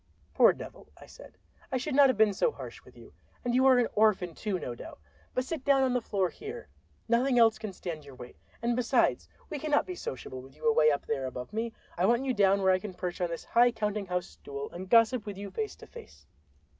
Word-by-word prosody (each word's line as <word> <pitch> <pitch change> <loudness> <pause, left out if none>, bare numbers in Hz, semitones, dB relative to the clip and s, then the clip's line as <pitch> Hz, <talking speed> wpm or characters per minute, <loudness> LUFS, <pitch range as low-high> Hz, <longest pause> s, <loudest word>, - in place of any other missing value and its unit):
"Poor - - +6
devil," - - -10
I - - -13
said, - - -15 0.3
"I 260 - +1
should 265 +3 -3
not 275 0 +6
have 255 - +1
been 215 -2 +4
so 470 - +1
harsh - - -9
with - - -18
you. - - -15 0.3
And 240 - 0
you 260 +2 +4
are 260 -1 +6
an 245 - +3
orphan, 205 -5 +2
too, 205 +2 -3
no 125 - -5
doubt. 120 - -10 0.4
But 255 - 0
sit 305 -1 -5
down 275 -1 +4
on 255 -1 +1
the 250 - +1
floor 195 -5 0
here—nothing 270 - -3
else 225 -2 +5
can 215 -2 -5
stand 170 -4 -6
your 140 -2 -13
weight—and 235 - -5
besides, 245 -1 +1 0.2
we 300 - -3
cannot 295 0 +1
be 365 - -5
sociable 130 - -6
with 135 +1 -15
you 155 - -3
away 155 -9 +5
up 145 -1 -1
there 135 -3 -2
above 125 +7 -7
me; 225 +1 -2 0.3
I 185 - +3
want 240 +3 +2
you 260 - +1
down 200 -2 +3
where 190 0 +5
I 185 - +2
can 190 -1 -8
perch 180 0 -4
on 175 - 0
this 165 - -6
high 240 +1 +4
counting 210 -3 -2
house 180 0 -1
stool 140 0 -8
and 185 +2 -8
gossip 230 0 +4
with 200 -2 -5
you 200 0 -7
face 435 -1 -4
to - - -13
face." 470 -2 -14
220 Hz, 235 wpm, -29 LUFS, 180-255 Hz, 0.4 s, Poor